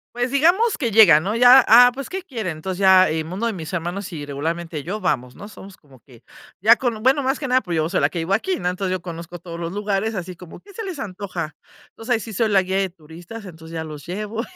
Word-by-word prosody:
Pues, 245 +1 -1
digamos 350 - +2
que 235 -7 -2
llegan, 175 -8 +7
¿no?, 210 +4 -2
ya, 250 +1 +8
ah, 245 +2 +9
pues, 275 0 -7
¿qué 380 +1 -4
quieren? 220 - -5
Entonces 185 +3 -5
ya, 190 -2 +6
eh, 160 0 -2
uno 185 +8 -4
de 225 - -2
mis 160 -2 -7
hermanos 180 +2 -4
y 150 -3 -6
regularmente 160 +2 -4
yo 205 +5 -4
vamos, 125 -7 -2
¿no? 205 - -9
Somos 195 -2 -13
como 135 -6 -21
que 120 -2 -19 0.4
ya 225 +5 +6
con 235 -4 -3
bueno 270 +3 +2
más 265 +3 -1
que 270 - -4
nada 255 +1 +3
porque 175 -5 -3
yo 155 0 +1
soy - - -1
la - - +3
que 170 - -5
vivo 170 +4 -1
aquí, 360 - -1
¿no? 180 - -3
Entonces 185 +1 -2
yo 185 -2 -2
conozco 170 0 -8
todos 170 0 -9
los 170 0 -5
lugares 205 +2 -2
así 180 -2 -6
como: 175 -1 -13
"¿Qué 400 -1 -18
se 445 - -6
les 365 -8 -6
antoja?". 185 -6 -6 0.4
Entonces 240 +2 -3
ahí 225 - +1
sí 220 0 -8
soy 220 +2 0
la 195 -2 +4
guía 190 +1 -2
de 190 -1 0
turistas. 170 +6 -12
Entonces 165 -2 -12
ya 160 0 -4
los 150 -2 -9
llevo 210 +5 -4
190 Hz, 260 wpm, -21 LUFS, 170-230 Hz, 0.4 s, ah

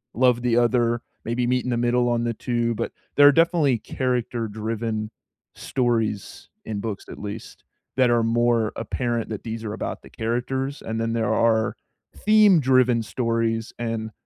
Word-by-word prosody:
love 125 -1 +3
the 120 -1 +2
other, 120 -1 +2 0.2
maybe 120 +1 -1
meet 125 0 +1
in - - -2
the 120 - 0
middle 120 +1 +2
on 120 0 +1
the 120 0 -1
2, 120 -1 -1
but - - -3 0.2
there 145 0 +8
are - - +9
definitely 165 -5 +3
character 120 -2 -2
driven 110 0 -3 0.5
stories 115 -5 -2 0.2
in 105 -2 -4
books, 105 -2 -5
at - - -8
least, 105 +2 -8 0.3
that 130 -2 +4
are 120 -1 +3
more 115 -1 +2
apparent 120 0 -2
that 110 - -5
these 115 -1 -5
are 105 - -3
about - - -5
the - - -13
characters, 130 +4 -2
and 110 0 -3
then 115 0 -1
there 110 -2 0
are 110 -1 +2 0.4
theme 210 -5 +5
driven 130 -3 +3
stories, 115 0 -1
and 115 -1 -3
115 Hz, 170 wpm, -24 LUFS, 115-125 Hz, 0.5 s, are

